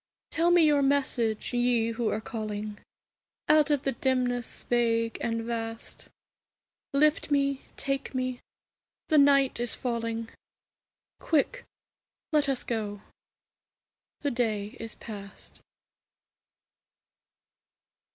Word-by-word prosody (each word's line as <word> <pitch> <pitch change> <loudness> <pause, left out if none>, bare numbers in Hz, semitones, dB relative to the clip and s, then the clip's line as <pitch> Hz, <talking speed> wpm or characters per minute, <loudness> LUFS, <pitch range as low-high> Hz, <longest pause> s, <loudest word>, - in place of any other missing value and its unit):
Tell 335 +2 +2
me 350 -2 +6
your 295 -2 +4
message, 260 -6 +1
Ye 240 -2 +2
who 230 0 -1
are 215 - -1
calling 215 -2 -5 0.7
Out 305 0 +5
of 290 -2 +2
the 270 - +1
dimness 250 -1 -1
vague 230 -1 +1
and 230 -1 -1
vast; 225 -1 -5 0.8
Lift 300 +3 +3
me, 275 -1 +1 0.2
take 275 0 -2
me, 255 -1 -1 0.7
the 310 - +6
night 275 -2 +4
is 240 -1 0
falling; 230 -2 -2 0.9
Quick, 330 - 0 0.7
let 295 -2 +3
us 265 -2 -1
go, 210 -3 -3 1.2
the 285 - 0
day 215 -4 -1
is 225 -1 -5
past. 200 -2 -10
245 Hz, 105 wpm, -28 LUFS, 225-280 Hz, 1.2 s, me